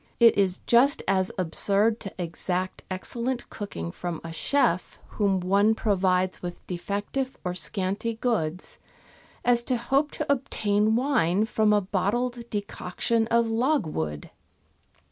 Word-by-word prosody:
It 235 Hz, -1 st, +7 dB
is 190 Hz, -2 st, +1 dB
just 255 Hz, +4 st, +4 dB
as 190 Hz, -1 st, +2 dB
absurd 200 Hz, +5 st, +1 dB
to 195 Hz, -, -7 dB
exact 180 Hz, +1 st, -3 dB
excellent 235 Hz, +6 st, -3 dB
cooking 85 Hz, -, -5 dB
from 175 Hz, -, -5 dB
a 165 Hz, -1 st, -6 dB
chef 180 Hz, -, +1 dB
whom 200 Hz, -3 st, +1 dB
one 200 Hz, +4 st, +3 dB
provides 185 Hz, -3 st, +1 dB
with 175 Hz, -1 st, -7 dB
defective 205 Hz, +9 st, -3 dB
or 180 Hz, -1 st, -2 dB
scanty 195 Hz, +4 st, -2 dB
goods, 190 Hz, -8 st, -2 dB, 0.7 s
as 240 Hz, -1 st, +4 dB
to 255 Hz, -, +1 dB
hope 270 Hz, +5 st, +1 dB
to 305 Hz, -, -3 dB
obtain 215 Hz, -5 st, +1 dB
wine 230 Hz, -, +2 dB
from 220 Hz, -1 st, +2 dB
a 210 Hz, -1 st, +4 dB
bottled 235 Hz, +6 st, -1 dB
decoction 210 Hz, +2 st, -1 dB
of 235 Hz, 0 st, +3 dB
logwood. 225 Hz, -, -1 dB
205 Hz, 125 wpm, -26 LUFS, 185-235 Hz, 0.7 s, It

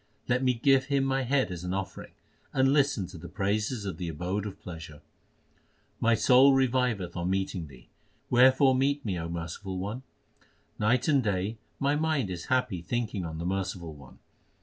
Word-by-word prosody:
Let 125 Hz, +1 st, +2 dB
me 130 Hz, -1 st, +2 dB
give 130 Hz, +2 st, +3 dB
him 140 Hz, -1 st, +1 dB
my 135 Hz, 0 st, +1 dB
head 130 Hz, -3 st, +1 dB
as 90 Hz, -1 st, -6 dB
an 90 Hz, +1 st, -2 dB
offering, 100 Hz, 0 st, -6 dB, 0.4 s
and 135 Hz, +1 st, +3 dB
listen 140 Hz, -9 st, +2 dB
to 90 Hz, -1 st, -10 dB
the 85 Hz, -, -9 dB
praises 105 Hz, +2 st, -1 dB
of 95 Hz, -5 st, -4 dB
the 90 Hz, -2 st, -3 dB
Abode 90 Hz, +6 st, -3 dB
of 100 Hz, -1 st, -9 dB
pleasure. 80 Hz, -4 st, -9 dB, 1.0 s
My 115 Hz, 0 st, +3 dB
soul 135 Hz, +3 st, +6 dB
reviveth 125 Hz, -7 st, +1 dB
on 85 Hz, +1 st, -2 dB
meeting 95 Hz, -3 st, -2 dB
Thee; 65 Hz, -3 st, -16 dB, 0.4 s
wherefore 130 Hz, +2 st, +5 dB
meet 140 Hz, +2 st, +1 dB
me, 95 Hz, -5 st, -2 dB
O 85 Hz, 0 st, -4 dB
Merciful 85 Hz, +3 st, -5 dB
One. 105 Hz, +7 st, -4 dB, 0.8 s
Night 120 Hz, +4 st, +2 dB
and 140 Hz, -3 st, +4 dB
day 105 Hz, +2 st, -1 dB, 0.2 s
my 140 Hz, +1 st, +2 dB
mind 150 Hz, -9 st, 0 dB
is 85 Hz, -2 st, -5 dB
happy 125 Hz, -8 st, 0 dB
thinking 110 Hz, 0 st, -2 dB
on 80 Hz, -1 st, -5 dB
the 85 Hz, -, -4 dB
Merciful 90 Hz, -3 st, -3 dB
One. 70 Hz, -3 st, -15 dB
105 Hz, 175 wpm, -28 LUFS, 90-130 Hz, 1.0 s, soul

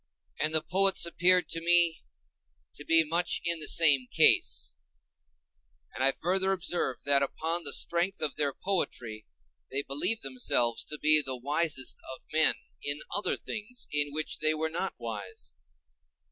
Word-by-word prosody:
And 155 Hz, +1 st, 0 dB
the 155 Hz, -, +3 dB
poets 195 Hz, 0 st, +2 dB
appeared 180 Hz, +1 st, +3 dB
to 165 Hz, -, -4 dB
me 170 Hz, -1 st, +4 dB, 0.7 s
to 145 Hz, -, -11 dB
be 165 Hz, +1 st, +5 dB
much 170 Hz, +3 st, 0 dB
in 170 Hz, -1 st, 0 dB
the 150 Hz, -, -1 dB
same 145 Hz, -6 st, +4 dB
case; -, -, +3 dB, 1.2 s
and -, -, -3 dB
I 135 Hz, -, +4 dB
further 190 Hz, +5 st, 0 dB
observed 175 Hz, -8 st, -3 dB
that 140 Hz, -1 st, +3 dB
upon 165 Hz, +5 st, -3 dB
the -, -, +2 dB
strength 175 Hz, +3 st, 0 dB
of 155 Hz, -, -2 dB
their 145 Hz, -2 st, -1 dB
poetry 125 Hz, -, -4 dB, 0.4 s
they 140 Hz, +1 st, -2 dB
believed 145 Hz, +12 st, -1 dB
themselves 125 Hz, -3 st, -1 dB
to 150 Hz, -, -7 dB
be 155 Hz, 0 st, +4 dB
the 130 Hz, -2 st, -6 dB
wisest 145 Hz, +1 st, -2 dB, 0.2 s
of -, -, -22 dB
men 160 Hz, 0 st, +4 dB, 0.3 s
in 145 Hz, +1 st, -3 dB
other 205 Hz, -, 0 dB
things 235 Hz, +3 st, -7 dB
in 145 Hz, -1 st, 0 dB
which 155 Hz, +1 st, -3 dB
they 155 Hz, 0 st, +2 dB
were 160 Hz, +1 st, -2 dB
not 175 Hz, +4 st, -4 dB
wise. 105 Hz, -5 st, -8 dB
155 Hz, 155 wpm, -28 LUFS, 140-175 Hz, 1.2 s, be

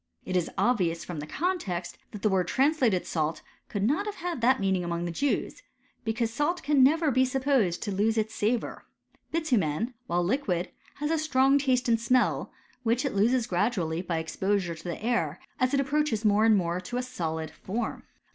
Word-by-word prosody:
It 185 Hz, -, -3 dB
is 180 Hz, -2 st, +1 dB
obvious 180 Hz, -9 st, +1 dB
from 175 Hz, -4 st, -5 dB
the 150 Hz, -, -6 dB
con 360 Hz, -, -1 dB
text, 175 Hz, -, -4 dB
that 210 Hz, -, -9 dB
the 215 Hz, -, +4 dB
word 185 Hz, -3 st, +1 dB
translated 260 Hz, -, +2 dB
salt 155 Hz, -1 st, -2 dB, 0.3 s
could 200 Hz, -2 st, -2 dB
not 300 Hz, -, +1 dB
have 415 Hz, -, -4 dB
had 345 Hz, -, -4 dB
that 260 Hz, +3 st, +4 dB
meaning 190 Hz, -2 st, +1 dB
among 170 Hz, 0 st, -2 dB
the 170 Hz, -, -2 dB
Jews; 285 Hz, -, -1 dB, 0.4 s
because 225 Hz, 0 st, -1 dB
salt 295 Hz, +8 st, -1 dB
never 295 Hz, +3 st, +4 dB
can. -, -, 0 dB
be 260 Hz, +1 st, +4 dB
supposed 260 Hz, -8 st, +1 dB
to 205 Hz, -, -3 dB
lose 215 Hz, +3 st, +1 dB
its 220 Hz, 0 st, 0 dB
savour. 220 Hz, +2 st, -1 dB, 0.4 s
Bitumen, 240 Hz, -, 0 dB
while 175 Hz, +1 st, +1 dB
liquid, 185 Hz, -4 st, -1 dB, 0.2 s
has 295 Hz, +2 st, -2 dB
a 325 Hz, -, +2 dB
strong 275 Hz, -2 st, +3 dB
taste 255 Hz, -3 st, +1 dB
and 230 Hz, -1 st, +3 dB
smell, 250 Hz, +2 st, +1 dB, 0.3 s
which 240 Hz, +3 st, +1 dB
it 275 Hz, -, -1 dB
loses 230 Hz, +4 st, +2 dB
gradually 175 Hz, -4 st, 0 dB
by 175 Hz, -2 st, -2 dB
exposure 180 Hz, +2 st, -1 dB
to 165 Hz, 0 st, -11 dB
the 175 Hz, +4 st, -5 dB
air, 175 Hz, -10 st, 0 dB, 0.2 s
as 255 Hz, 0 st, +2 dB
it 280 Hz, -, +2 dB
approaches 275 Hz, -5 st, 0 dB
more 210 Hz, +1 st, +4 dB
and 220 Hz, -2 st, +6 dB
more 175 Hz, -1 st, -1 dB
to 240 Hz, +7 st, -5 dB
a 250 Hz, -, -1 dB
solid 160 Hz, -9 st, -4 dB
form. 220 Hz, +8 st, -4 dB
225 Hz, 195 wpm, -28 LUFS, 180-260 Hz, 0.4 s, and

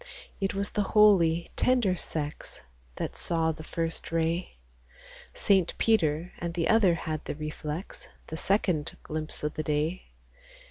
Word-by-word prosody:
It 195 Hz, 0 st, -1 dB
was 200 Hz, +1 st, -2 dB
the 210 Hz, -, 0 dB, 0.2 s
holy, 175 Hz, -6 st, +5 dB
tender 240 Hz, -8 st, +3 dB
sex 150 Hz, -3 st, -5 dB, 0.3 s
That -, -, -4 dB
saw 165 Hz, -1 st, +1 dB
the 155 Hz, 0 st, -8 dB
first 165 Hz, +1 st, -3 dB
ray: 165 Hz, -, -1 dB, 0.8 s
Saint 190 Hz, -4 st, +2 dB
Peter 170 Hz, -6 st, +2 dB
and 170 Hz, -1 st, -4 dB
the 170 Hz, -2 st, 0 dB
other 215 Hz, -6 st, +5 dB
had 155 Hz, -2 st, -4 dB
the -, -, -4 dB
reflex, 150 Hz, +2 st, -5 dB, 0.2 s
The 160 Hz, -, -4 dB
second 180 Hz, -5 st, 0 dB
glimpse 155 Hz, 0 st, -5 dB
o' 150 Hz, -, +1 dB
th' 155 Hz, -, -4 dB
day. 155 Hz, +5 st, -1 dB
165 Hz, 140 wpm, -28 LUFS, 155-190 Hz, 0.8 s, holy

